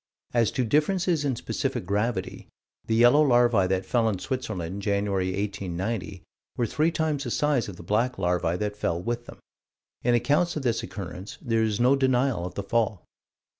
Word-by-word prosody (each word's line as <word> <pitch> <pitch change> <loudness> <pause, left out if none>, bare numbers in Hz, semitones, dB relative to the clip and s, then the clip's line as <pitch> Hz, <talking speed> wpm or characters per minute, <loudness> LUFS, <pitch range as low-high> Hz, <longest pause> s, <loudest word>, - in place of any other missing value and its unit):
As 115 -3 +3
to 130 - 0
differences 160 - +1
in 135 -3 0
specific 115 - -3
gravity 105 +5 -2 0.4
the 110 - +1
yellow 120 +6 +6
larvae 120 -8 +4
that 95 0 0
fell 115 -2 +2
in 100 - -1
Switzerland 95 -5 -4
January, 100 -2 0
1890, 95 0 -3 0.3
were 120 - +1
three 155 +8 +1
times 155 -4 -1
the 125 - -4
size 140 -4 +1
of 95 - -8
the 85 - -11
black 115 +8 0
larvae 90 -2 0
that 105 0 -2
fell 85 -4 -1
with 120 +5 -3
them. - - -10 0.7
In 120 0 +3
accounts 145 +8 +2
of 150 - -3
this 120 -3 +1
occurrence, 95 0 -7
there 115 -1 0
is 110 -2 0
no 125 +3 +5
denial 130 -7 +1
of 90 - -10
the 100 - -3
fall. 110 -3 0
115 Hz, 175 wpm, -26 LUFS, 95-130 Hz, 0.7 s, yellow